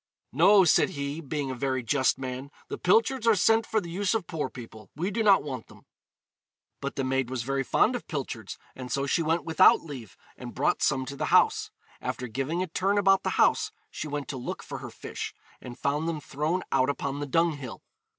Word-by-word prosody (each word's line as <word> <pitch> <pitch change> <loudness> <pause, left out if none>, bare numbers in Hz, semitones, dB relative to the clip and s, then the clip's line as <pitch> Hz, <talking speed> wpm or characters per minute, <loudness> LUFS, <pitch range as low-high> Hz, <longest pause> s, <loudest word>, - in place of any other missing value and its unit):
'No,' 190 +7 +6
said 170 - +4
he, 140 +2 -4
being 140 -2 -3
a - - -3
very 130 0 -1
just 130 +3 +2
man, 130 +1 -5 0.2
'the - - -5
pilchards 225 +6 +2
are 225 - +6
sent 225 +4 +3
for 220 - +1
the 170 -5 -7
use 195 +4 0
of 215 -5 -1
poor 155 -4 -3
people; 110 -5 -11
we 175 +7 -2
do 225 +3 -1
not 200 -3 +5
want 130 -5 -6
them.' - - -18 1.0
But 140 - -4
the 135 - -1
maid 130 -1 0
was 130 -3 -3
very 135 +2 -1
fond 220 - +2
of 245 - -6
pilchards, 125 - -5 0.2
and 125 -1 -7
so 140 0 0
she 140 - +1
went 165 +1 +1
without 160 - +6
leave, 130 - -9 0.2
and - - -9
brought - - +1
some 130 -1 +1
to 140 - -6
the - - -2
house. - - +3 0.3
After 125 - -4
giving 135 +10 -2
a - - -4
turn 195 +4 0
about 195 -1 +4
the - - -1
house, 435 - +3 0.2
she - - -5
went 145 -1 -4
to 135 - -4
look 125 - -5
for - - -7
her - - -7
fish, - - -7 0.3
and 120 -1 -9
found 150 +3 -1
them 160 -2 -3
thrown 155 +6 -2
out 130 +2 +3
upon 140 0 -2
the 145 - -3
dunghill. 145 -4 -1
145 Hz, 215 wpm, -27 LUFS, 130-180 Hz, 1.0 s, No